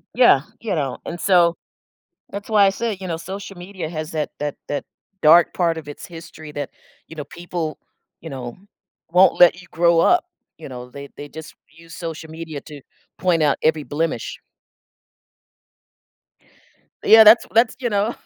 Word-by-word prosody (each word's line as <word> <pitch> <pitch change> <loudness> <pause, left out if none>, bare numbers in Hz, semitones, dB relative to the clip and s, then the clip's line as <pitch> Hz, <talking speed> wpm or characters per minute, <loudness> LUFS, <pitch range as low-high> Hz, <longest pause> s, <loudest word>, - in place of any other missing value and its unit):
yeah, 240 - +6 0.2
you 220 -4 -3
know? 140 -6 -2
And 175 - -6
so, 175 -3 +4 0.7
that's 200 0 -7
why 210 -2 +5
I - - +5
say, 220 +2 -2
you 185 - -5
know, 165 -2 -3
social 195 +3 -8
media 180 -2 -7
has 155 -1 -5
that 155 -2 -2
that 145 -1 -2
that 145 - -3 0.4
dark 165 +3 +7
part 170 -2 +1
of 150 - -13
its 145 - -9
history 165 -3 -11
that, 145 -2 -5 0.4
you 160 - -12
know, 150 - -5
people 170 0 -5 0.4
you 160 - -8
know, 125 -4 -7 0.6
won't 180 +2 +5
let 175 0 +6
you 185 - -17
grow 170 0 +3
up, 355 - +4 0.3
you 160 - -9
know? 125 -1 -9
They 140 0 -9
they 145 - -8
just 155 +1 -11
use 165 +2 -15
social 165 -1 -7
media 160 -2 -7
to 150 -3 -10 0.4
point 175 -3 +1
out 145 -2 +2
every 155 -1 +2
blemish. 160 +3 -3 2.7
Yeah, 220 0 +9
that's 220 +2 +7
that's 230 +1 +3
you 245 -2 -1
know? 210 +2 0
165 Hz, 170 wpm, -21 LUFS, 155-190 Hz, 2.7 s, Yeah